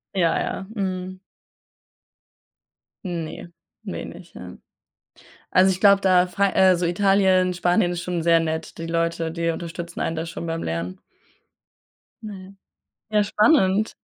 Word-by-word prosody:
Ja, 170 -3 +2
ja, 190 - -4
mhm. 185 -1 -4 1.9
Ne, 170 0 -6 0.3
wenig, 180 -3 -8
ja. 90 0 -10 1.0
Also, 185 +1 +5
ich 185 0 -2
glaube 200 -1 +6
da, 185 -2 +4
Fra 195 +2 0
äh, 190 -1 +5
so 175 0 -1
Italien, 185 0 +3
Spanien 175 +1 +1
ist 175 0 -4
schon 180 -2 -3
sehr 165 0 +4
nett. 160 0 -4
Die 165 - -5
Leute, 165 0 -1
die 165 0 -1
unterstützen 170 +1 -6
einen 165 - -2
da 160 - -3
schon 170 0 -7
beim 165 0 -3
Lernen. 85 +3 -4 1.2
Mhm. 195 -2 -10 0.5
Ja, 210 -1 +3
spannend. 210 -1 +2
180 Hz, 130 wpm, -23 LUFS, 165-190 Hz, 1.9 s, glaube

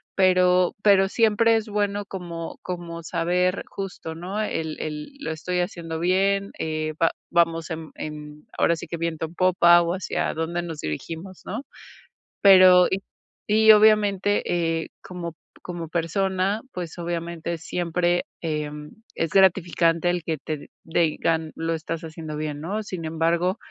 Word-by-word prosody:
Pero 180 -1 +4
pero 195 -2 +5
siempre 225 +1 +3
es 220 -1 -1
bueno 205 -1 -1
como 170 -4 -7
como 170 -2 -6
saber, 180 +3 0
justo, 195 -4 -6
¿no?, 185 +5 -5
el 160 -6 -3
el: 150 - -5
"Lo 285 - -4
estoy 180 +3 -2
haciendo 165 -3 -4
bien, 195 +3 +1
eh, 155 0 -2
va 165 - +4 0.2
vamos 165 -1 +1
en 160 -1 -5
en, 150 0 -8
ahora 170 - +3
sí - - -7
que, 170 - -4
viento 165 -1 -2
en 160 - -10
popa, 175 -2 +5
o 170 +1 -1
hacia 190 - -2
dónde 165 +2 -2
nos 165 -3 -6
dirigimos", 165 - -6
¿no? 225 +8 -4 0.8
Pero 185 -2 +8
y 190 - +2 0.5
y, 220 +1 +6
obviamente, 205 -2 +4
eh, 165 -2 -1
como 170 -3 -7 0.3
como 170 -3 -6
persona, 190 +5 0
pues, 175 -2 -6
obviamente, 170 0 -3
siempre, 175 +1 0 0.2
em, 150 -2 -4 0.2
es 165 0 -1
gratificante 175 -3 +3
el 175 -1 -1
que 160 -1 -2
te 150 +1 -6 0.2
digan: 160 -1 0
"Lo 165 0 -2
estás 165 0 -4
haciendo 160 -1 -7
bien", 150 -1 -4
¿no? 205 +6 -3
Sin 185 -5 -6
embargo, 165 +3 +1
170 Hz, 145 wpm, -24 LUFS, 160-190 Hz, 0.8 s, Pero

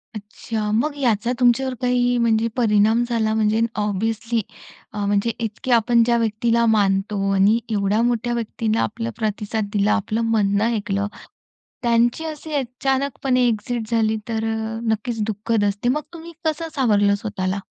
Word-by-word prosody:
अच्छा. 215 +1 -5
मग 285 +7 0
याचा 235 -3 +1
तुमच्यावर 255 +1 +3
काही, 245 -1 +2
म्हणजे 230 -1 +2
परिणाम 220 -1 +3
झाला, 220 -2 +1
म्हणजे 220 0 +1 0.2
ऑब्व्हियसली, 220 +3 -1 0.5
अ, 205 -1 -2
म्हणजे 205 +3 +1
इतके 230 +3 -4
आपण 235 0 +4
ज्या 235 0 +2
व्यक्तीला 230 +1 +1
मानतो, 200 -2 +1
आणि 200 +4 +4
एवढ्या 205 0 +1
मोठ्या 240 0 0
व्यक्तीला 225 -1 -1
आपला 230 +2 -3
प्रतिसाद 215 -1 -2
दिला, 205 0 +2
आपलं 220 +2 -1
म्हणणं 205 -1 +2
ऐकलं. 200 -1 -1 0.8
त्यांची 235 +5 +2
अशी 310 0 -6
अचानकपणे 265 -1 0
एक्सिट 230 0 -2
झाली 220 -1 +2
तर 220 -1 -1
अ, 220 0 -4
नक्कीच 220 +1 -2
दुःखद 220 +1 -1
असते. 205 +4 0
मग 295 +4 +1
तुम्ही 335 0 -10
कसं 315 +1 -1
सावरलं 205 -7 +3
स्वतःला? 200 -2 -3
225 Hz, 140 wpm, -21 LUFS, 210-240 Hz, 0.8 s, आपण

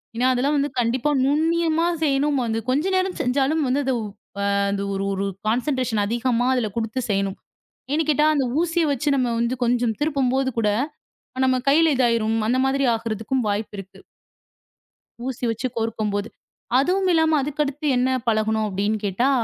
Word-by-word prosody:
ஏன்னா 245 +2 +2
அதெல்லாம் 280 +3 +1
கண்டிப்பா 245 +4 +1 0.2
நுண்ணியமா 325 +3 +2 0.2
செய்யணும், 285 0 +1
வந்து 225 -1 -1
கொஞ்ச 285 +7 +1
நேரம் 370 0 -1
செஞ்சாலும் 275 +5 +1
வந்து 265 +3 +1
அது 265 - +1
ஒ - - -4 0.5
அ - - +1 0.4
ஒரு 195 0 -2
ஒரு 195 +1 -2 0.2
கான்சண்ட்ரேக்ஷன் 245 -3 0
அதிகமா 240 +2 0
அதுல 235 -4 -1
குடுத்து 230 +2 -2
செய்யணும். 195 0 0 0.6
ஏன்னு 315 +2 +1
கேட்டா 300 +1 +3
அந்த 275 - +1 0.2
ஊசிய 340 -1 +1
வச்சு 280 +2 -1
நம்ம 240 -1 0
கொஞ்சம் 240 -2 +1
திருப்பும் 275 -4 +1
போது 265 0 +1
கூட 210 - +2 0.8
நம்ம 255 0 +2
கைல 320 +2 +4
இது 255 - +3
ஆயிடும். 225 -1 +1
அந்த 255 +2 +2
மாதிரி 275 +1 +1
ஆகறதுக்கும் 225 +2 -2
வாய்ப்பு 205 +1 -2
இருக்கு. 195 0 -10 1.3
ஊசி 255 -1 -3
வச்சு 225 +3 -2
கோர்க்கும் 225 -2 -1
போது. 205 +1 -2 0.5
அதுவும் 370 +6 +1
இல்லாம 320 -1 +3
அதுக்கு 295 +2 -2
அடுத்து 295 +1 -4
என்ன 255 +1 +2 0.2
பழகனும் 220 -1 +1
அப்படின்னு 205 +2 -1
கேட்டா, 205 +7 +1
255 Hz, 155 wpm, -23 LUFS, 225-290 Hz, 1.3 s, கைல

